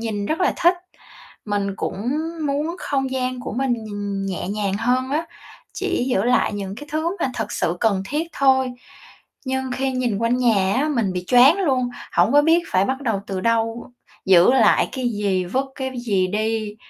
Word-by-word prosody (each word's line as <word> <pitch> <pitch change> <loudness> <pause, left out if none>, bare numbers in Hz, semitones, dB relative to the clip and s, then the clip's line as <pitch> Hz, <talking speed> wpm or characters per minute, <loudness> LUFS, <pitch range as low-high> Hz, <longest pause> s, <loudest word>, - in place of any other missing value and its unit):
nhìn 210 -3 -3
rất 315 - -2
là 370 - +3
thích. 345 +1 +4 0.7
Mình 200 -2 -2
cũng 210 +6 -3 0.4
muốn 295 +5 -1
không 270 -2 -2
gian 255 -1 -2
của - - -6
mình 240 -2 -1
nhìn 205 -2 -4
nhẹ 185 -1 -4
nhàng 200 -1 -1
hơn 255 +3 0
á. 315 +4 -1 0.5
Chỉ - - -1
giữ 195 -7 +1
lại 245 -2 +2
những 195 -1 -5
cái 295 - -9
thứ 325 +4 -1
mà 260 - 0
thực 220 -3 -4
sự 170 - -1
cần 200 -4 +2
thiết 315 +3 -2
thôi. 265 -2 +2 0.7
Nhưng 260 0 -2
khi 265 +1 -1
nhìn 245 -5 -1
quanh 230 +2 +1
nhà 205 -6 +2
á, 285 +4 +1
mình 230 -10 0
bị 180 0 -3
choáng 260 +8 +6
luôn, 260 -9 +1 0.2
hổng - - +3
có 290 +1 +6
biết 325 +3 +4
phải 185 +1 +2
bắt 265 +1 -2
đầu 225 -6 -1
từ 190 -1 -3
đâu, 230 +2 -1 0.4
giữ 185 +3 +6
lại 265 - +4
cái 255 -2 -1
gì, 200 -4 0
vứt 260 +9 -1
cái 265 -1 -3
gì 200 -6 +1
đi. 215 +1 -2
245 Hz, 190 wpm, -21 LUFS, 205-265 Hz, 0.7 s, choáng